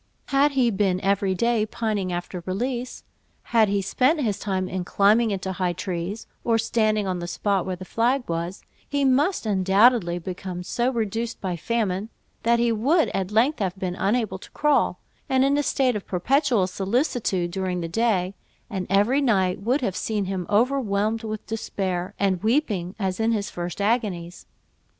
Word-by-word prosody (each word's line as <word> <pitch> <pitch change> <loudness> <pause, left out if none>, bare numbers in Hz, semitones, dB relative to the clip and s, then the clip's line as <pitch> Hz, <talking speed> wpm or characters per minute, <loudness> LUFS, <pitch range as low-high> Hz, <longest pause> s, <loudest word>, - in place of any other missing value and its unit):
Had 280 +1 +3
he 250 -3 +3
been 195 -3 +1
every 195 -1 +1
day 235 +2 +2
pining 215 -4 -2
after 175 +1 -4
release, 245 +6 -3 0.5
had 220 -3 +5
he 200 -1 0
spent 265 - +2
his 210 -7 -1
time 190 -2 -1
in 185 -1 -3
climbing 210 +5 +3
into 190 -2 -2
high 180 -1 -1
trees, 185 +3 -4 0.2
or 230 -1 +2
standing 215 -2 +1
on 185 -2 -2
the 175 - -5
spot 195 +1 0
where 185 - -2
the 185 +1 -9
flag 245 +6 0
was, 170 +3 -3 0.3
he 285 -1 +1
must 280 +5 +2
undoubtedly 195 -1 +3
become 180 0 -6
so 240 +6 0
reduced 225 0 -2
by 185 -3 -2
famine, 205 +1 -1 0.3
that 235 +1 +3
he 235 0 +2
would 280 +10 +2
at 190 -1 -2
length 235 +8 +2
have 190 -2 -2
been 185 -2 -2
unable 200 0 0
to - - -13
crawl, 290 -10 +1 0.3
and 265 0 +3
in 280 +1 +3
a 290 - +2
state 265 -4 +1
of 205 - -5
perpetual 240 - +2
solicitude 195 - -1
during 185 -1 -2
the 165 - -3
day; 190 -1 +1 0.4
and 190 -3 -3
every 205 +9 +3
night 195 -8 +2
would 250 +8 +1
have 195 -7 -1
seen 210 -1 -1
him 185 -2 -3
overwhelmed 220 -1 +1
with 215 -1 -5
despair, 195 -4 -3
and 190 -3 +1
weeping 215 - 0
as 190 -2 -2
in 225 +1 +2
his 205 -2 -2
first 175 0 -5
agonies. 200 -6 -1
205 Hz, 175 wpm, -24 LUFS, 185-235 Hz, 0.5 s, had